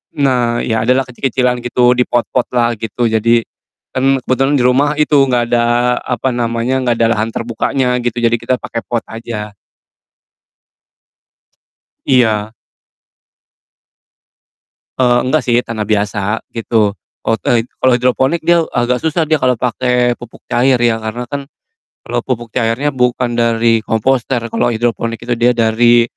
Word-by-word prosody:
Nah, 125 -4 +1
iya, 110 0 -1
adalah 130 +1 +3
kecil-kecilan 125 0 -1
gitu, 120 0 +2
di 125 0 +3
pot-potlah 120 -1 0
gitu. 115 +1 -1
Jadi, 115 +1 +2 0.5
kan 135 +1 +1
kebetulan 135 +3 +1
di 125 - +2
rumah 130 +4 +3
itu 150 0 +1
gak 120 -2 0
ada 120 +1 +2
apa 125 +1 -2
namanya, 120 +2 -1
gak 120 - +2
ada 115 0 +2
lahan 110 0 0
terbukanya 120 +3 -1
gitu, 120 0 -2
jadi 115 0 +3
kita 130 - 0
pake 115 - -4
pot 120 -1 -2
aja. 110 -2 -6 2.5
Iya. 110 -5 +2 2.5
Eee, 125 -1 +3
enggak 130 +2 0
sih, 120 -1 +2
tanah 110 -3 -4
biasa, 105 0 -1
gitu. 110 -2 0 0.3
Kalo 115 - +1
te 115 +4 +1 0.2
kalo 130 - +2
hidroponik 130 +6 +1
dia 170 +1 +3
agak 125 0 +1
susah 160 0 0
dia 160 - +4
kalo 130 -2 +2
pake 125 +1 0
pupuk 120 -1 -13
cair 125 0 +2
ya, 115 -1 +2
karena 110 +2 -5
kan 140 -1 -4 0.6
kalo 120 0 -2
pupuk 120 -2 -4
cairnya 125 +4 0
bukan 125 -1 0
dari 115 -1 +2
komposter, 125 +2 0
kalo - - +1
hidroponik 115 0 -1
itu 120 - -5
dia 120 +1 +3
dari, 120 +1 +4
120 Hz, 140 wpm, -15 LUFS, 115-130 Hz, 2.5 s, dia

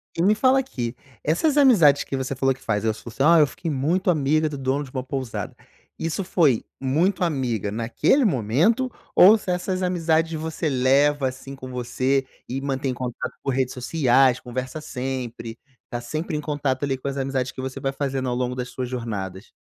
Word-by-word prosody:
E 165 - -1
me 205 +4 +4
fala 260 +4 +4
aqui: 125 - -4 0.3
essas 285 - +1
amizades 180 - +6
que - - -4
você 130 0 -3
falou 135 +1 +2
que 130 - -18
faz, 105 -1 -1
eu 110 - +2
sou 115 +1 -10
si 135 - -1
"Ah, 165 +2 +6
eu 150 - +5
fiquei 165 +1 -5
muito 170 +7 +1
amiga 155 +1 +2
do 145 -2 -5
dono 135 +2 0
de 130 - -11
uma 130 -2 -3
pousada". 130 -3 -4 0.4
Isso 165 +4 -2
foi 155 -9 +2 0.2
muito 165 +9 +1
amiga 125 - -1
naquele 115 - +2
momento 180 - +2 0.2
ou 210 +5 +8
se 195 - -8
essas 185 +1 -2
amizades 165 -2 +1
você 160 0 -2
leva, 135 +2 +3
assim, 135 +1 -9
com 130 -1 -9
você 130 +2 0 0.2
e 135 +2 -3
mantém 135 -1 -1
em - - -3
contato 125 -1 -5
por 135 - 0
redes 130 -1 0
sociais, 130 -1 +3
conversa 130 +4 -5
sempre, 125 -4 -5 0.3
tá 120 - -3
sempre 155 +6 -4
em - - -3
contato 145 -3 -2
ali 135 -1 0
com 135 - -7
as 140 0 -3
amizades 135 -1 -1
que 130 - -7
você 130 0 -5
vai 135 - -1
fazendo 135 -2 -2
ao 120 - -1
longo 125 0 -1
das 125 0 -4
suas 125 0 -5
jornadas? 105 -5 -5
135 Hz, 200 wpm, -23 LUFS, 125-160 Hz, 0.4 s, ou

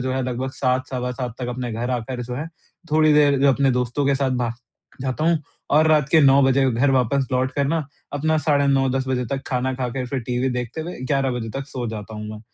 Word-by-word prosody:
जो 130 +1 -1
है 130 0 -1
लगभग 130 +1 -3
7, 130 -1 0
सवा 125 -1 -3
7 125 -2 -5
तक 125 -1 -4
अपने 125 -1 -4
घर 120 +3 -3
आकर 125 +1 -3
जो 125 +1 -5
है 150 +5 -4 0.4
थोड़ी 155 0 +4
देर 145 -2 +4
अपने 135 0 +3
दोस्तों 125 +3 0
के 140 - +3
साथ 135 -1 0
भा 120 - 0
क 115 - -7 0.5
जाता 135 +4 -2
हूँ 170 -1 +3 0.3
और 155 +2 +5
रात 150 -2 +3
के 160 - +6
9 140 0 +6
बजे 135 0 +3
घर 130 +4 +2
वापस 130 +1 +2
लौट 130 +1 +1
कर 140 0 0
ना 160 -2 0 0.3
अपना 155 +2 +1
साढ़े 145 -2 +2
9, 135 -1 +3
10 130 0 -1
बजे 125 -1 0
तक 135 0 -2
खाना 130 +1 -1
खाके 125 0 -3
फिर 130 0 -3
टीवी 125 +2 0
देखते 125 +4 -4
हुए 170 -1 -6
11 135 0 0
बजे 120 -2 -3
तक 135 - -8
सो 125 -2 -4
जाता 110 0 -7
हूँ 105 0 -6
मैं। 105 0 -8
130 Hz, 245 wpm, -22 LUFS, 125-140 Hz, 0.5 s, के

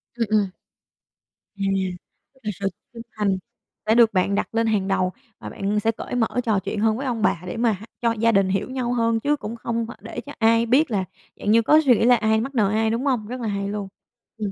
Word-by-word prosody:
Ừm, 235 -1 0
ừm. 210 -3 +3 1.1
À, 200 - -3 0.8
là 210 - -2
sự 195 - 0 0.3
chân 230 - -8 0.2
thành 200 -3 +1 0.5
đã 220 +1 +3
được 235 -1 +5
bạn 195 +1 +2
đặt 215 - -2
lên 230 0 +2
hàng 205 -3 +1
đầu 185 -1 +1 0.3
và - - -7
bạn 205 +2 -1
sẽ 225 +2 +1
cởi 225 - -6
mở 230 -2 +2 0.2
trò 220 -4 +2
chuyện 205 +3 -4
hơn 220 +1 +2
với 275 - -4
ông 240 -4 -2
bà 170 - +1
để 180 - -5
mà 230 0 +3
h 200 +1 -8 0.2
cho 235 -1 +2
gia 230 0 +2
đình 195 -3 +3
hiểu 195 +5 -1
nhau 255 -2 -2
hơn, 230 -1 +1
chứ 290 +5 +1
cũng 230 -5 -6
không 230 0 -2
phải - - -10
để 240 - -6
cho - - -10
ai 230 +1 +4
biết 260 +4 +3
là 200 -3 +1 0.4
dạng 205 - 0
như 230 +1 +6
có 300 +7 +5
suy 250 -4 +6
nghĩ - - +2
là 245 0 +7
ai 220 -1 +2
mắc 270 +4 -5
nợ 210 -5 +3
ai, 220 +1 +1
đúng 230 +5 -1
hông? 245 -7 0
Rất 250 +2 -5
là 230 - -2
hay 200 -1 -2
luôn. 200 -1 -4 0.5
Ừm, 210 -2 -3
225 Hz, 250 wpm, -23 LUFS, 205-235 Hz, 1.1 s, là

